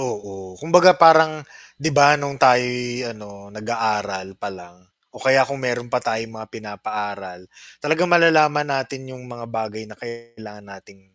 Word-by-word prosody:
Oo. 100 -7 -8
Kumbaga 180 +3 +5
parang 160 -2 +6 0.4
'di 160 +3 -1
ba 145 +1 +6
nung 140 -1 -5
tayo'y 125 -1 +2
ano, 100 -1 -15
nag-aaral 105 -4 -4
pa 105 - -6
lang 90 -1 -15 0.3
o - - -11
kaya 135 -1 +3
kung 140 - -5
meron 120 -1 -3
pa 125 - -2
tayong 115 0 -3
mga 110 -1 -11
pinapaaral, 100 -3 -8 0.3
talagang 160 +4 0
malalaman 155 -3 +4
natin 135 -1 -4
yung 125 - -14
mga 120 -1 -11
bagay 110 -1 -6
na 105 - -14
kailangan 115 -3 -12
nating 95 0 -20
115 Hz, 150 wpm, -20 LUFS, 105-140 Hz, 0.4 s, parang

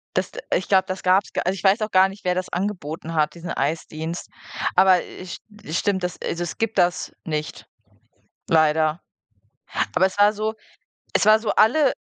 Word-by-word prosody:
Das - - -1
d - - -8 0.2
ich - - -1
glaube, 190 -1 +4
das 185 0 -5
gab's 185 +2 +3
gar - - -2
also, 185 - +1
ich 180 - -9
weiß 195 +3 +4
auch 215 0 -2
gar 190 0 +6
nicht, 195 +1 -12
wer 180 - +1
das 185 0 -3
angeboten 170 -4 -4
hat, 155 +1 +1
diesen 170 0 -7
Eisdienst. 160 +3 -3 0.5
Aber 185 -1 +5
ich 185 0 -9 0.3
es 160 - -3
stimmt, 190 -2 0
das 180 -1 -3
also, 170 - -3
es 170 - -6
gibt 225 0 -2
das 175 0 +1
nicht, 155 -2 -4 0.8
leider. 155 0 +3 0.9
Aber 190 - +4
es 190 +1 -6
war 205 +1 +6
so 215 +1 -2 0.6
es - - +2
war 215 0 +7
so 220 - -2
alle 265 +6 +4
185 Hz, 190 wpm, -23 LUFS, 165-205 Hz, 0.9 s, war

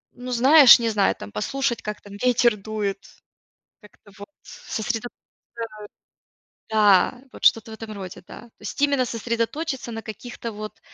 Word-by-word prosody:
ну, 250 +1 -7
знаешь, 260 +2 +8
не 230 -1 0
знаю 205 -3 +2
там, 100 +1 -10
послушать 240 - -2
как 210 0 -6
там 205 - -13
ветер 245 -2 +3
дует, 205 -1 -3 0.8
как-то 210 0 -19
вот 205 - -10
сосредоточиться 240 - -5 1.5
Да. 210 +2 +4
Вот - - -13
что-то 225 0 +3
в - - -6
этом 220 -1 -8
роде, 190 -3 -8
да. - - -11
То 235 - -17
есть - - -7
именно 280 -3 +3
сосредоточиться 235 +4 -3
на 225 - -6
каких-то 230 +2 -7
вот 215 0 -8
225 Hz, 150 wpm, -23 LUFS, 210-245 Hz, 1.5 s, знаешь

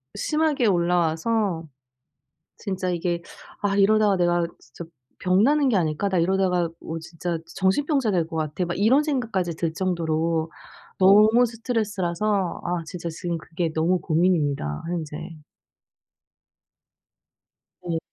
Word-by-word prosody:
심하게 305 -6 +1
올라와서 175 +1 +1 0.9
진짜 185 -3 -3
이게 170 0 -2 0.4
'아 200 -1 0
이러다가 205 0 +4
내가 175 -1 +2
진짜 130 +7 -11 0.4
병나는 260 +11 +3
게 220 - +2
아닐까? 165 +3 0
나 185 -2 0
이러다가 180 -1 +1
뭐 165 0 -5
진짜 165 +1 -4 0.2
정신병자 240 - +1
될 170 -4 +1
것 165 - -10
같아.' 155 +3 -2
막 175 - -3
이런 250 +9 +4
생각까지 220 - -1
들 165 -1 -1
정도로 165 -2 -1 0.5
너무 215 +5 +6
스트레스라서 210 -5 -1
아 175 -1 -1
진짜 170 0 -6
지금 170 +1 -4
그게 165 0 -3
너무 170 +3 +1
고민입니다 155 - 0
현재. 160 -4 -4 2.7
네. 165 -2 -1
180 Hz, 260 characters per minute, -24 LUFS, 165-205 Hz, 2.7 s, 너무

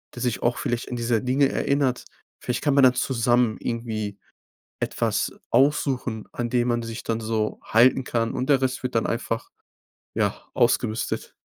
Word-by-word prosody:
der 120 - -7
sich 125 -2 -1
auch 120 0 +2
vielleicht 120 +1 -2
an 125 - -3
dieser 120 -1 +1
Dinge 135 +4 +2
erinnert. 140 -3 0 0.4
Vielleicht 125 - -2
kann 145 -2 +2
man 140 - +5
dann 130 -1 +7
zusammen 120 -3 +2
irgendwie 110 -4 -3 0.6
etwas - - -1 0.2
aussuchen, 130 -5 +1
an 120 -1 -3
dem 120 0 +1
man 120 0 +1
sich 115 0 -6
dann 115 -1 -1
so 110 -1 -1
halten 125 +4 +4
kann 115 -2 -1
und 130 - -3
der 135 -2 +4
Rest 130 0 -1
wird 125 - -3
dann 115 - +2
einfach, 115 0 -3 0.7
ja, - - 0
ausgemistet. 110 +1 0
120 Hz, 165 wpm, -24 LUFS, 115-130 Hz, 0.7 s, dann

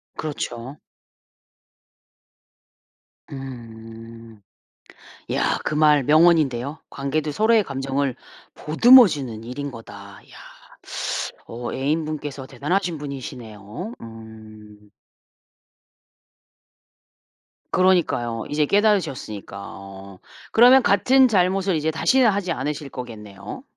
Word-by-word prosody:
그렇죠. 135 -3 -6 2.5
음. 115 -3 -10 0.9
야 - - 0
그 - - -2
말 150 -2 +4
명언인데요. 150 -3 +3
"관계도 145 +2 -2
서로의 220 +5 +3
감정을 135 -2 -2 0.4
보듬어 240 +10 +7
주는 130 - -5
일인 140 +4 -5
거다." 115 -4 -11 0.4
야. - - -15 1.1
어 120 +1 -6
애인분께서 145 -1 -3
대단하신 175 +4 -2
분이시네요. 130 - -8
음. 110 -2 -13 2.8
그러니까요. 160 -11 +1
이제 150 0 +1
깨달으셨으니까 180 - 0
어. 95 -1 -11 0.3
그러면 250 +3 +7
같은 260 +6 +4
잘못을 190 -3 +1
이제 155 0 0
다시는 250 +9 +3
하지 195 -3 -1
않으실 145 0 -4
거겠네요? 105 - -9
140 Hz, 210 characters per minute, -22 LUFS, 115-170 Hz, 2.8 s, 보듬어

